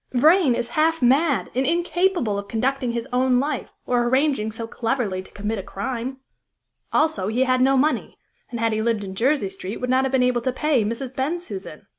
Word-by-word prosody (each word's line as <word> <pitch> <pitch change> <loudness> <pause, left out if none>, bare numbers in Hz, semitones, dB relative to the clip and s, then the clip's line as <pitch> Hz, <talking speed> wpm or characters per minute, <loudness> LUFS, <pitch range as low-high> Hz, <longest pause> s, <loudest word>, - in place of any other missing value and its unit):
"Vrain 305 +1 +5
is 235 - -3
half 325 +1 +2
mad 280 +4 +3
and 260 - +1
incapable 345 - +1
of 200 - -8
conducting 250 +2 -1
his 235 -1 -3
own 250 0 +3
life, 285 0 -2
or 245 -1 +1
arranging 260 -4 +1
so 225 +1 -6
cleverly 225 -4 -2
to 190 - -15
commit 210 +1 -4
a - - -2
crime. 245 +7 -4 0.7
Also 305 -12 +1
he 235 +5 +1
had 255 -1 +2
no 270 +1 +4
money, 300 +4 0 0.3
and, 235 - -5
had 225 -1 +1
he 215 - 0
lived 225 -2 0
in 190 -1 -6
Jersey 235 0 +1
Street, 195 +2 -6
would 250 0 -2
not 260 +1 +3
have 265 - -1
been 260 -2 +3
able 250 -1 +2
to 255 - 0
pay 280 -2 +1
Mrs. 235 +4 -4
Bensusan. 265 - -4
250 Hz, 200 wpm, -23 LUFS, 225-275 Hz, 0.7 s, Vrain